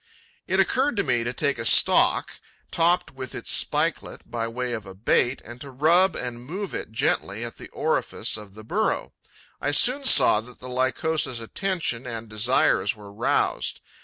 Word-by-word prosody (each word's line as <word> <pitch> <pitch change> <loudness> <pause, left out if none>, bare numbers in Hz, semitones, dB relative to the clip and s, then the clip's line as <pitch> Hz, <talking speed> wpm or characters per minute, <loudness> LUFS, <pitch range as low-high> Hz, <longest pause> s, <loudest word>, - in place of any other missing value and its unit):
'It - - +1
occurred 270 +1 +2
to 200 - +2
me 120 -8 0
to 120 - -2
take 140 +2 -1
a - - -3
stalk, - - +4 0.3
topped 170 +2 +1
with 130 -1 -7
its - - -3
spikelet, - - 0
by 115 -1 -2
way 125 +1 -4
of 110 -4 -6
a 95 - -10
bait, 120 +5 +1
and 120 +1 -11
to 140 - -8
rub 165 +7 +3
and 120 -1 -5
move 190 +9 -6
it - - -5
gently 110 0 -1
at 115 - -8
the - - -11
orifice - - -1
of 105 -2 -10
the 110 - -11
burrow. 110 - -1 0.5
I - - 0
soon 250 - +4
saw 125 - +6
that 125 +2 -14
the 130 - -10
Lycosa's 130 +1 -1
attention 150 - -3
and 115 -1 -6
desires 110 +3 +1
were 100 -1 -13
roused. 60 -9 -1
125 Hz, 175 wpm, -24 LUFS, 115-155 Hz, 0.5 s, saw